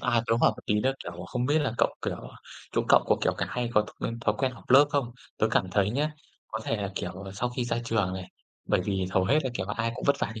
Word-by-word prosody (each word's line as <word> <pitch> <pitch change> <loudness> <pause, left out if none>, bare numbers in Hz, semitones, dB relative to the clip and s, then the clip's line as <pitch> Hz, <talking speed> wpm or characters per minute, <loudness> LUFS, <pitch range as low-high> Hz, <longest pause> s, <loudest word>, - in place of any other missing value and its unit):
à, 115 -1 +2
tớ 115 0 +3
hỏi - - +6
một - - -10
tí 105 - +2
là, 130 +4 +2
kiểu, 90 - -5
không 125 0 -1
biết 150 +3 +3
là 145 -6 0
cậu, - - +3
kiểu, - - -2 0.6
chỗ - - +2
cậu - - +7
có, - - +4
kiểu, - - +3
cái - - -1
hay 125 -1 -2
có 105 - +7
thói 105 - -6
quen 115 - -3
thói 105 -2 +1
quen 130 -2 +1
họp 115 -3 -15
lớp 135 +3 +9
không? 140 -5 0 0.3
Tớ 110 - +4
cảm 95 -5 +1
thấy 100 +1 +2
nhá, 145 +6 0 0.4
có 110 - -4
thể 115 - 0
là, 100 -2 -3
kiểu, 90 - -3
ờ, 95 +1 -8
sau 120 +5 -1
khi 125 0 -2
ra 120 -1 -1
trường 105 -5 +1
này, 95 -1 -6 0.4
bởi - - +2
vì 95 -2 0
hầu 95 -1 +2
hết 140 +10 +4
là, 130 - 0
kiểu 95 -5 -2
là, 105 - -3
ai 115 0 0
cũng - - -6
vất 140 - +4
vả - - -1
như 110 - -7
115 Hz, 300 wpm, -28 LUFS, 100-125 Hz, 0.6 s, lớp